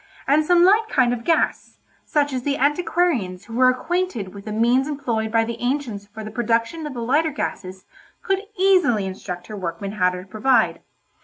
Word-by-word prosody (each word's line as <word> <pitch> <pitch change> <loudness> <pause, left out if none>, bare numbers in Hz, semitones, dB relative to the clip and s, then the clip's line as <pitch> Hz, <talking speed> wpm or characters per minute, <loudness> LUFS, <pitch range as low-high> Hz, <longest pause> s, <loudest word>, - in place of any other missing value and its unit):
and 295 +3 +4
some 345 +2 +4
light 425 +4 +4
kind 255 -4 +2
of 235 -1 -5
gas, 330 +3 0 0.3
such 290 -2 0
as 255 - -2
the 280 +2 -1
antiquarians 285 - 0
who 230 - -11
were 255 +2 +5
acquainted 255 - -2
with 200 -1 -11
the 215 - -5
means 240 +5 +2
employed 235 -7 -2
by 225 0 +3
the 235 +1 -6
ancients 245 -6 -2
for 220 +1 -9
the 215 - -7
production 235 +7 -1
of 280 - -8
the - - -4
lighter 290 +7 +2
gases 185 -9 -5 0.4
could 390 0 +1 0.2
easily 360 - +3
instruct 185 -2 -6
her 215 - -8
workmen 185 +1 -4
how 180 -3 +2
to 180 0 -6
provide. 220 +6 +1
245 Hz, 185 wpm, -22 LUFS, 210-295 Hz, 0.4 s, were